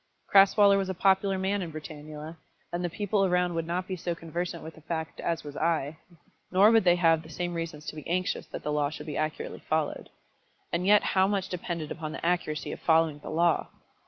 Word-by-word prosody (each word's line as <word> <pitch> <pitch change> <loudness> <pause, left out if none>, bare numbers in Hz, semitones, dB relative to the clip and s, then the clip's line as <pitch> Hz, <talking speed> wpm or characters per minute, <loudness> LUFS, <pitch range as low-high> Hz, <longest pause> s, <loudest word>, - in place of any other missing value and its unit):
Crasweller 200 0 +7
was 190 -1 -2
a 190 - -2
popular 190 +1 +3
man 195 +2 0
in 170 -3 -5
Britannula, 155 +1 -8 0.4
and 175 +1 -2
the 175 - 0
people 205 +3 0
around 180 -1 +2
would 165 -1 -2
not 180 +2 -2
be 185 - -3
so 175 -1 -3
conversant 170 +1 -4
with 160 - -8
the 160 - -16
fact 160 0 -4
as 165 -1 -2
was 145 -1 -8
I, 155 -2 0 0.5
nor 195 +4 +6
would 225 -4 +4
they 175 -1 +6
have 165 -2 +3
the 160 - -14
same 175 +2 -3
reasons 165 -3 -5
to - - -6
be 155 - -8
anxious 180 +2 -1
that - - -7
the 150 - -2
law 150 -1 +1
should 150 0 -8
be 150 -2 -5
accurately 155 0 -3
followed. 155 -1 -2 0.6
And 175 +2 0
yet 210 0 +6
how 190 0 +3
much 195 -2 -1
depended 170 -3 -4
upon 155 -2 -5
the 165 - -6
accuracy 170 -3 -1
of - - -6
following 160 -2 +3
the - - -9
law! 170 +1 +2
170 Hz, 215 wpm, -28 LUFS, 155-185 Hz, 0.6 s, Crasweller